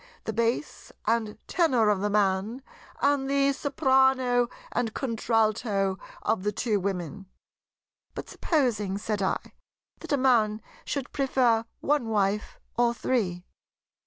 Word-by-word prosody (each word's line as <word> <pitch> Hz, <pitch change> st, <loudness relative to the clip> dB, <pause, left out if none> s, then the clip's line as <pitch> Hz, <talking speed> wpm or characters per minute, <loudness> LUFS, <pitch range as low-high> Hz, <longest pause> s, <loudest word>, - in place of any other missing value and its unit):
the 220 Hz, -, -3 dB
Bass 235 Hz, +6 st, -1 dB
and 225 Hz, -2 st, 0 dB
Tenor 260 Hz, -11 st, +3 dB
of 205 Hz, -2 st, +2 dB
the 205 Hz, -, 0 dB
Man 205 Hz, +4 st, +1 dB, 0.4 s
and 280 Hz, -1 st, +2 dB
the 280 Hz, 0 st, +3 dB
Soprano 265 Hz, -4 st, +2 dB, 0.2 s
and 235 Hz, -2 st, -1 dB
Contralto 215 Hz, -5 st, 0 dB, 0.2 s
of 225 Hz, -, +1 dB
the 210 Hz, +2 st, 0 dB
two 210 Hz, 0 st, 0 dB
Women?" 190 Hz, 0 st, -4 dB, 0.9 s
"But -, -, -6 dB
supposing," 220 Hz, -, 0 dB
said 210 Hz, 0 st, -2 dB
I, 190 Hz, -, -2 dB, 0.5 s
"that -, -, -8 dB
a 285 Hz, -, +3 dB
man 230 Hz, -5 st, +3 dB, 0.3 s
should 280 Hz, -3 st, -3 dB
prefer 250 Hz, -5 st, +2 dB, 0.2 s
one 290 Hz, -5 st, +1 dB
wife 205 Hz, -1 st, 0 dB, 0.2 s
or 235 Hz, 0 st, +2 dB
three?" 190 Hz, -9 st, -1 dB
230 Hz, 125 wpm, -27 LUFS, 205-265 Hz, 0.9 s, Tenor